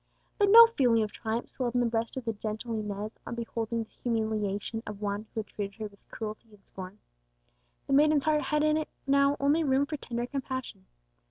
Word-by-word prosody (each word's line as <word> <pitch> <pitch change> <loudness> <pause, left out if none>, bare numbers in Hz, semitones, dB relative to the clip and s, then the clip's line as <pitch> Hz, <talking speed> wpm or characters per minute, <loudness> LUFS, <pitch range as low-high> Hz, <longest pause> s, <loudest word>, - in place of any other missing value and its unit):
But 405 -1 +4
no 465 +3 +11
feeling 245 - +3
of 210 - -4
triumph 225 +1 -3
swelled 250 -2 -3
in - - +4
the 245 - +2
breast 230 +1 -1
of 255 - -4
the 225 - -1
gentle 215 +2 -4
Inez 210 0 -4
on - - -4
beholding 230 0 -3
the 220 - -18
humiliation 220 -2 -1
of 210 -1 -6
one 205 +1 -3
who 220 - 0
had - - -11
treated 200 -1 -6
her 220 - -5
with 200 -1 -13
cruelty 215 +1 -6
and 205 -2 -20
scorn. 190 +1 -9 0.9
The - - -1
maiden's 295 0 +5
heart 305 0 +2
had 300 0 0
in 305 0 +3
it 310 - -3 0.2
now 280 +1 +3
only 290 +4 +3
room 275 -1 +3
for 300 +1 -4
tender 240 -3 -3
compassion. 260 -7 -5
230 Hz, 205 wpm, -29 LUFS, 215-275 Hz, 0.9 s, no